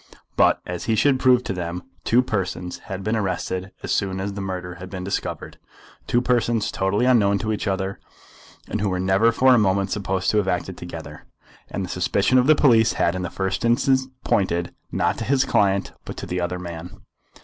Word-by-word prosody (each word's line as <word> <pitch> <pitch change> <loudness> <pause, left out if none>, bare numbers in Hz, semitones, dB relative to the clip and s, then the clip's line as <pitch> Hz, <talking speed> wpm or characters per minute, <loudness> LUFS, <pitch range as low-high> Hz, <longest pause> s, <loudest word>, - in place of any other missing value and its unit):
But, - - +4
as 90 -1 -5
he 110 - +1
should 135 +3 +3
prove 125 -1 +4
to 95 - -3
them, 90 0 -4 0.2
two 125 +2 +3
persons 95 -6 -3
had 95 0 -4
been 110 +3 0
arrested 95 -1 -2
as - - -3
soon 95 -1 0
as 100 +1 -3
the 100 - -5
murder 90 -2 -4
had 90 - -7
been 95 -1 -6
discovered, 100 - -4 0.5
two 120 - +2
persons 120 -3 +1
totally 95 +5 0
unknown 105 -6 +4
to 110 +2 -2
each 105 - -3
other, 95 0 -2 0.7
and 105 - -3
who 105 - +1
were 90 -1 -1
never 95 +5 +3
for 130 +2 +5
a 120 - +5
moment 95 -1 +1
supposed 95 -2 0
to 105 - +1
have 100 -2 +1
acted 90 0 -2
together, 85 -2 -9 0.4
and 95 - -3
the - - -8
suspicion 100 +7 +2
of 125 - +2
the 155 - +7
police 115 -6 +4
had 85 - +1
in 95 - -3
the 90 - -3
first 95 +1 -2
instance 130 +3 +2 0.2
pointed, 85 -3 0 0.2
not - - 0
to - - -2
his 135 +3 +2
client, 100 -5 +2
but - - -8
to - - -5
the 90 0 -2
other 90 +1 -2
man. 85 -1 -8
95 Hz, 205 wpm, -23 LUFS, 90-115 Hz, 0.7 s, the